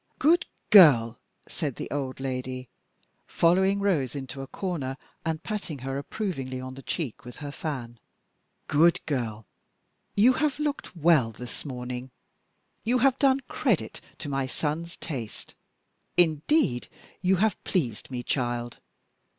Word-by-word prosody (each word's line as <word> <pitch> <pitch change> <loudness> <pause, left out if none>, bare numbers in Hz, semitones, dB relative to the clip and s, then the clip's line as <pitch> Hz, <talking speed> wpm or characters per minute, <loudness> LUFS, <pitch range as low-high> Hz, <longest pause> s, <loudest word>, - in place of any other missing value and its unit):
"Good 335 +4 +4 0.2
girl," 135 - +8 0.3
said 145 -7 -3
the - - -5
old 135 -3 -3
lady, 130 -1 -4 0.6
following 190 +4 +3
Rose 160 -12 +1
into 135 -1 -5
a 135 - -6
corner, 145 -9 -3 0.3
and 160 -1 -2
patting 205 -8 -4
her 135 +1 -2
approvingly 140 -7 -4
on 130 0 -6
the 135 - -9
cheek 140 -4 -4
with 125 -1 -9
her 145 -1 -6
fan; 125 -7 -5 0.7
"good 165 +4 +4
girl, 115 -7 -2 0.7
you 235 +6 +6
have 300 0 0
looked 295 -8 -3
well 155 -8 +4
this 120 +2 -8
morning 125 -1 -5 0.7
you 245 +3 +2
have 265 +1 +3
done 270 -1 +4
credit 255 - -1 0.2
to 155 - -6
my 135 -2 -1
son's 160 +5 -3
taste. 125 -9 -6 0.6
Indeed, 160 - +3 0.3
you 185 +1 +4
have 210 +2 +1
pleased 125 - -1
me, 125 -2 -4
child! 120 -2 -2
145 Hz, 135 wpm, -27 LUFS, 130-185 Hz, 0.7 s, girl